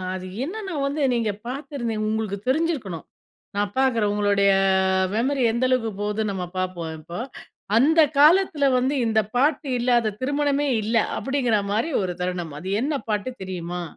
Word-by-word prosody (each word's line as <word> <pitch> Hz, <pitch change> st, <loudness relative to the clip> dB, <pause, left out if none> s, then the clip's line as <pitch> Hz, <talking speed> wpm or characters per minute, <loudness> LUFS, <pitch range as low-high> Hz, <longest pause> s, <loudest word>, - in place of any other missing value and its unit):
அது 185 Hz, 0 st, -6 dB, 0.2 s
என்னன்னா 390 Hz, +4 st, -5 dB
வந்து 285 Hz, +2 st, -2 dB
நீங்க 230 Hz, -3 st, 0 dB, 0.2 s
பாத்திருந்தீங்க 240 Hz, -5 st, -3 dB
உங்களுக்கு 215 Hz, -2 st, -2 dB
தெரிஞ்சிருக்கணும் 260 Hz, -, -1 dB, 0.5 s
நான் 205 Hz, 0 st, 0 dB
பாக்குறன் 230 Hz, -6 st, +2 dB
உங்களுடைய 200 Hz, -1 st, +3 dB, 0.6 s
மெமரி 265 Hz, +4 st, +1 dB
எந்த 235 Hz, +3 st, 0 dB
அளவுக்கு 250 Hz, -3 st, +1 dB
போதுன்னு 210 Hz, 0 st, -1 dB
நம்ம 185 Hz, -2 st, -4 dB
பார்ப்போம் 180 Hz, -3 st, -3 dB
இப்போ. 170 Hz, +3 st, -8 dB, 0.6 s
அந்த 310 Hz, +7 st, +5 dB, 0.2 s
காலத்தில 310 Hz, 0 st, +5 dB
வந்து 260 Hz, +3 st, 0 dB
இந்த 220 Hz, -1 st, +3 dB, 0.2 s
பாட்டு 285 Hz, +3 st, +2 dB
இல்லாத 240 Hz, -3 st, +2 dB
திருமணமே 285 Hz, +1 st, 0 dB
இல்ல 225 Hz, +3 st, -1 dB, 0.2 s
அப்படிங்கிற 265 Hz, -5 st, +1 dB
மாரி 225 Hz, +10 st, 0 dB
ஒரு 185 Hz, -1 st, -2 dB
தருணம். 180 Hz, -3 st, -3 dB
அது 185 Hz, -, -7 dB
என்ன 295 Hz, +3 st, -1 dB, 0.2 s
பாட்டு 210 Hz, +4 st, -1 dB
தெரியுமா? 180 Hz, -1 st, -5 dB
230 Hz, 140 wpm, -23 LUFS, 200-280 Hz, 0.6 s, அந்த